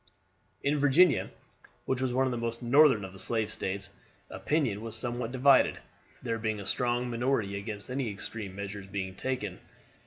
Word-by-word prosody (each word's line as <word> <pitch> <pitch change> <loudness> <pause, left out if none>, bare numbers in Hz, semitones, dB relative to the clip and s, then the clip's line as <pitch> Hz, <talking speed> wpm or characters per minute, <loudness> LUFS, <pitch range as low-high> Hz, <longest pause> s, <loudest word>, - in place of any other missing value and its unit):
In 145 +1 +1
Virginia, 145 +2 +4 0.6
which 130 -1 -1
was 130 -1 0
one 130 +2 +2
of 130 - 0
the - - -1
most 115 +1 -3
northern 130 -4 +5
of 95 - -10
the 95 - -12
slave 110 -1 0
States, 100 +1 -3 0.4
opinion 130 -10 0
was 115 -1 -4
somewhat 120 0 -3
divided, 135 +1 +5 0.5
there 115 -2 -2
being 110 -1 -1
a 100 - -7
strong 120 +2 0
minority 120 -4 0
against 105 +1 -5
any 130 -2 -1
extreme 100 -1 -6
measures 100 0 -6
being 95 -1 -4
taken. 105 -5 -3
115 Hz, 165 wpm, -30 LUFS, 100-130 Hz, 0.6 s, northern